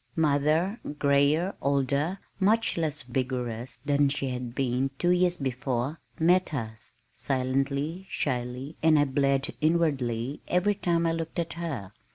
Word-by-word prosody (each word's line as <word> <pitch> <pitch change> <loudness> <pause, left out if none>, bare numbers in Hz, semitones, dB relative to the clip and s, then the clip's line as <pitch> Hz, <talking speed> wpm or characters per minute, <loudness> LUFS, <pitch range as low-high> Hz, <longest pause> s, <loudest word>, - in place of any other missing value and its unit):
Mother, 155 +6 +2 0.2
grayer, 145 +6 +3
older, 140 +5 +1 0.2
much 215 +4 +3
less 155 -3 -1
vigorous 125 -1 -3
than 145 0 +3
she 135 -1 -2
had 125 -1 -5
been 130 0 0
two 175 +4 +2
years 180 0 +3
before, 130 +2 -2 0.2
met 175 0 +3
us, 110 -4 -6 0.2
silently, 135 +7 -1
shyly, 125 +2 -3
and 160 -1 +5
I 145 - +4
bled, 140 0 +1
inwardly, 140 -6 +1
every 180 +4 +2
time 170 -4 0
I 165 - +2
looked 165 0 -4
at 170 -1 -1
her. 145 - -5
140 Hz, 135 wpm, -28 LUFS, 130-165 Hz, 0.2 s, and